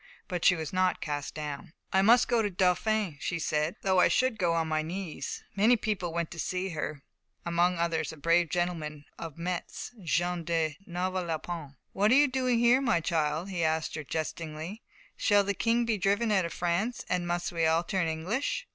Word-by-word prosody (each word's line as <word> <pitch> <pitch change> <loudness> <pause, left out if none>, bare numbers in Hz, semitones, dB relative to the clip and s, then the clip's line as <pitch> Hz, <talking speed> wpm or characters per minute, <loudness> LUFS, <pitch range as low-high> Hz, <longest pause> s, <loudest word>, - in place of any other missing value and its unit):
But 180 -3 -3
she 180 - +6
was 160 0 -5
not 185 0 +2
cast 145 -2 -4
down. 150 0 -6 0.2
"I 190 - +5
must 235 +5 +6
go 235 -1 +3
to 210 - 0
the 185 - -15
Dauphin," 185 -1 +1
she 170 - -2
said, 155 0 0
"though 190 -1 +3
I - - +6
should 255 -4 +1
go 175 -3 +2
on 165 -1 0
my 155 0 0
knees." 175 +1 -5
Many 220 +5 +5
people 200 -6 -2
went 170 -1 -2
to 170 - -8
see 185 +5 -2
her, 155 -4 -4 0.4
among 175 +1 +2
others 165 -2 0
a 160 - -11
brave 165 +2 +3
gentleman 160 -4 -2
of 165 -3 -7
Metz, 175 +6 -4
Jean 175 0 0
de 160 -2 0
Novelonpont. 175 -4 -3 0.2
"What 205 +2 +3
are - - +7
you 290 +1 +6
doing 255 -2 +1
here, 240 +3 +5
my 235 -10 +2
child?" 160 +2 -1
he 175 -3 -1
asked 160 0 0
her, 155 - -4
jestingly. 160 - -5 0.4
"Shall 205 -1 +4
the 200 +1 0
King 230 +3 +1
be 220 -3 0
driven 205 +4 +2
out 190 -4 +3
of 170 - -5
France, 180 +8 -1
and 175 -1 -1
must 175 0 -1
we 165 -2 +1
all 165 +1 +3
turn 185 -1 0
English?" 175 - -2
175 Hz, 200 wpm, -29 LUFS, 160-200 Hz, 0.4 s, are